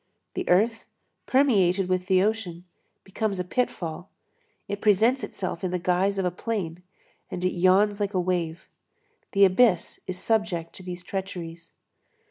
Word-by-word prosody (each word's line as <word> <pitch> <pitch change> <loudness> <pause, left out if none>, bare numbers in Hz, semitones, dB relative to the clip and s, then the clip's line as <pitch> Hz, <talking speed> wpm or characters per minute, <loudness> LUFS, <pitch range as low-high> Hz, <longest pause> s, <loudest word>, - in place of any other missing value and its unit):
The - - -4
earth, 220 +5 +3 0.4
permeated 195 -9 +3
with 185 0 -1
the 185 0 +4
ocean, 195 -5 -2 0.4
becomes 200 +1 -2
a - - 0
pitfall. 180 -5 -3 0.6
It 205 0 -4
presents 225 +5 +3
itself 185 -2 -5
in 185 - 0
the 180 - -1
guise 180 +3 +1
of 190 - 0
a 180 - +1
plain, 180 -4 -4 0.5
and 180 0 -4
it 185 - +2
yawns 195 +4 +3
like 205 -1 -2
a - - +3
wave. 175 -2 -2 0.7
The 200 0 +6
abyss 190 -1 +3
is 185 - -4
subject 190 -5 -1
to - - -11
these 180 -1 -7
treacheries. 170 -4 -6
185 Hz, 150 wpm, -26 LUFS, 180-205 Hz, 0.7 s, The